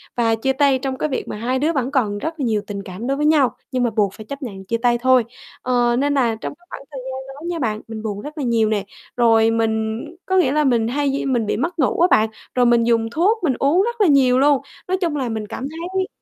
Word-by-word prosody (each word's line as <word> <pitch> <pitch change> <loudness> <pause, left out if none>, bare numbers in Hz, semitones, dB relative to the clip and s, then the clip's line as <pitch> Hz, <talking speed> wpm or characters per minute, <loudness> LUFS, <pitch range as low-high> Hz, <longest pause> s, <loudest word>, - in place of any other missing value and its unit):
và 230 -2 +2
chia 265 +4 0
tay 275 -2 +3
trong 265 0 -3
cái 305 - -1
việc 265 - -3
mà - - -5
hai 250 +4 -1
đứa 320 +4 +1
vẫn 265 -1 -1
còn 215 -7 0
rất 320 +7 -5
là 265 - 0
nhiều 215 -2 +1
tình 200 -1 -5
cảm 190 +7 -7
đối 275 +1 0
với 300 - 0
nhau, 300 -4 +3 0.2
nhưng 255 -1 0
mà 240 - +2
buộc 205 -3 0
phải 215 - -11
chấp 280 +6 -7
nhận 195 -6 -7
chia 230 +4 -1
tay 240 0 +2
thôi. 255 0 +4 0.4
Ờ, 245 -1 +2
nên 285 +1 +1
là 240 -5 +2
trong - - -4
cái 350 - -27
khoảng 275 - -8
thời 270 - -6
gian 265 - -6 0.2
đó 305 +4 -10
nha 345 -2 -3
bạn, 215 -4 -2
mình 220 -1 -7
buồn 205 -2 -4
rất 300 +2 -9
là 285 - -2
nhiều 230 -3 +2
nè, 205 -2 -1 0.3
rồi 225 -1 +4
mình 220 0 -1 0.2
có 375 0 +1
nghĩa 275 -8 +3
là 300 +1 +2
mình 235 -4 +2
hay 280 +3 0
di 275 - -2
mình 245 -5 +1
bị 210 - -1
mất 335 +6 -3
ngủ 270 - +1
á 355 - +6
bạn, 215 0 +4 0.3
rồi 250 -1 +4
mình 235 -1 +4
dùng 230 -1 +1
thuốc 375 - +2 0.2
uống 305 +7 +3
rất 475 -1 -3
là 390 - +5
nhiều 260 -3 +4
luôn. 280 0 +4 0.3
Nói 370 - 0
chung 330 -4 0
là 260 -4 -2
mình 220 -1 -4
cảm 260 +6 -5
thấy 365 +4 -3
255 Hz, 275 wpm, -20 LUFS, 225-290 Hz, 0.4 s, á